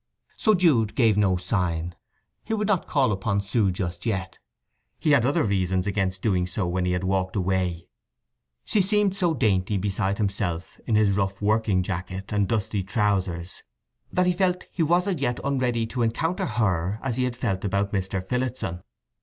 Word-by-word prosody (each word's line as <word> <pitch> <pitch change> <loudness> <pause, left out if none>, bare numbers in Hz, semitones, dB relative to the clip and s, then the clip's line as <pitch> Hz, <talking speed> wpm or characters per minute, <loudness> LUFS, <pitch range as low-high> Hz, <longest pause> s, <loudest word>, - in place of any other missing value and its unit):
So 215 -1 +3
Jude 140 - +3
gave 115 -5 +4
no 100 -3 +3
sign. 90 -3 -1 0.5
He 225 - -2
would 210 -1 -1
not 195 -5 +1
call 135 -6 +2
upon 100 +1 0
Sue 100 +1 +1
just 90 -1 -4
yet. 95 -5 -3 0.6
He 155 - +1
had 130 -4 +4
other 140 - +2
reasons 95 -3 0
against 95 -2 -1
doing 90 -5 +1
so 90 +2 -2
when 90 +1 -1
he 90 - +1
had 90 +1 -1
walked 95 0 0
away. 90 -3 -1 0.8
She 210 - +2
seemed 200 0 +2
so 175 -4 +1
dainty 100 -4 +1
beside 100 +1 -1
himself 95 -5 -2
in 110 - +2
his 105 -2 +4
rough 95 0 -1
working 105 -3 +2
jacket 95 +2 -5
and 100 -1 +2
dusty 105 -2 -1
trousers 95 -3 -1 0.5
that 180 - +2
he 180 - +3
felt 180 0 0
he 175 - -3
was 175 +3 +3
as 185 -8 -1
yet 120 -3 0
unready 125 -4 0
to 120 +2 -4
encounter 160 +10 0
her, 100 -4 0
as 130 -3 -1
he 130 - +2
had 125 -1 -2
felt 105 -6 -2
about 100 +1 0
Mr. 95 -1 -2
Phillotson. 125 -8 -2
100 Hz, 180 wpm, -25 LUFS, 95-125 Hz, 0.8 s, gave